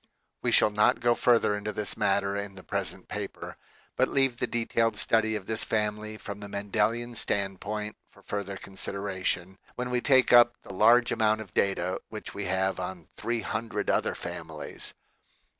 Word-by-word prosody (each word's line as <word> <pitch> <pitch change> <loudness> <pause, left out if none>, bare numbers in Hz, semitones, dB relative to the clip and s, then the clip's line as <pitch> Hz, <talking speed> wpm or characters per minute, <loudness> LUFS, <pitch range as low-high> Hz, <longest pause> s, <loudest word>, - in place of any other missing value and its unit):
We - - +1
shall 105 - +5
not 105 +1 +3
go 120 0 +4
further 115 -3 +3
into 105 +1 -3
this 105 -1 -3
matter 100 -1 +1
in 100 -1 -4
the 95 - -11
present - - -3
paper, - - -6 0.4
but - - +3
leave 135 -3 +2
the - - 0
detailed 115 -1 0
study 110 -1 +2
of 100 -3 -4
this 110 +2 -2
family 105 0 -1
from 100 -1 -7
the 100 - -7
Mendelian 105 +4 0
standpoint 105 0 -2
for - - -21
further 100 -1 -4
consideration, 95 -1 -3 0.2
when 125 0 -3
we 125 -1 +1
take 130 -2 +5
up 120 0 +8
the - - -9
large 115 +5 +5
amount 110 0 +2
of 100 -5 -11
data 95 -2 0
which - - -7
we - - -4
have 95 +1 0
on 90 -2 -6
three 120 -1 -2
hundred 110 -1 -2
other - - +1
families. - - -6
105 Hz, 170 wpm, -28 LUFS, 100-115 Hz, 0.4 s, up